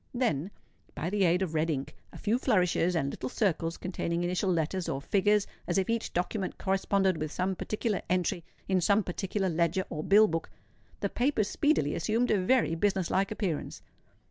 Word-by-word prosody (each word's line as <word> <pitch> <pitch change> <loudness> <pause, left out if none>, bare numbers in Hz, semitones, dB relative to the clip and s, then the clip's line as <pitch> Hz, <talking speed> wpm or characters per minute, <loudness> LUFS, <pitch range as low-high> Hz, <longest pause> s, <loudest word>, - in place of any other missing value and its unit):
Then, 195 - 0 0.5
by 170 +4 -3
the 200 -2 +2
aid 180 +2 +3
of 170 -4 -4
red 160 +1 +1
ink, 140 -3 -3 0.2
a - - -11
few 225 +3 0
flourishes, 180 -7 +2
and 140 -4 0
little 130 - -5
circles 165 - 0
containing 175 -1 -2
initial 180 +2 0
letters 170 +2 -1
or 135 - -2
figures 205 +6 +2 0.2
as - - 0
if 190 +3 +1
each 230 -1 -2
document 185 +2 -2
corresponded 190 -1 +1
with 155 -1 -3
some 185 +2 -1
particular 215 +1 -2
entry 180 -1 0 0.2
in 190 -1 +2
some 200 +4 +3
particular 190 +2 -2
leger 170 +2 +1
or 155 -1 -3
bill 210 +2 +6
book, 165 -2 -3 0.5
the - - 0
papers 240 -5 +1
speedily 290 - +1
assumed 225 +8 0
a 205 -3 +3
very 230 -2 +2
business 190 +1 0
like 195 +1 +2
appearance. 195 -8 -3
185 Hz, 180 wpm, -29 LUFS, 170-205 Hz, 0.5 s, bill